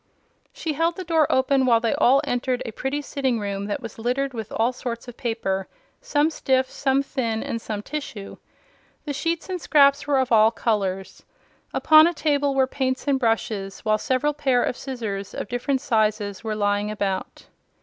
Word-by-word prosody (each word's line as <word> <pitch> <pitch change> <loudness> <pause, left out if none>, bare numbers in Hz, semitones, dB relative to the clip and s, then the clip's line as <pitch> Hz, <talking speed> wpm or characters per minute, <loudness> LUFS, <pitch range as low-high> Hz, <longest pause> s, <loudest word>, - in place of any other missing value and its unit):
She 315 - -4
held 330 +3 +1
the 370 - -5
door 325 -4 +2
open 260 0 +2
while 230 -2 +5
they 230 -1 0
all 265 +3 +4
entered 245 0 -1
a 230 - -4
pretty 270 +6 -3
sitting 265 -5 -1
room 200 -1 -3
that 245 +6 -3
was 230 -1 -8
littered 260 +4 -1
with 220 -3 -6
all 235 +3 +1
sorts 240 -1 -6
of 245 - -9
paper 225 -7 -2 0.3
some 295 +2 +1
stiff, 260 -3 0
some 275 0 +1
thin, 230 -5 -2
and 230 - -4
some 210 -2 -5
tissue. 255 -9 -6 0.7
The 290 - -3
sheets 330 +3 -2
and 365 -2 -4
scraps 280 -2 +4
were 285 -2 +2
of 260 -2 0
all 220 -1 +6
colors. 195 -5 -2 0.5
Upon 310 +1 +6
a 345 - -2
table 285 -3 +1
were 265 -1 +4
paints 260 +1 -2
and 275 -2 +2
brushes, 220 -5 -1
while 215 0 +1
several 265 +6 0
pair 270 -4 +1
of - - -1
scissors, 220 -8 -5
of - - -4
different 255 +3 -1
sizes, 215 -5 0
were 220 -1 -2
lying 205 0 0
about. 200 -3 -3
250 Hz, 180 wpm, -23 LUFS, 215-280 Hz, 0.7 s, all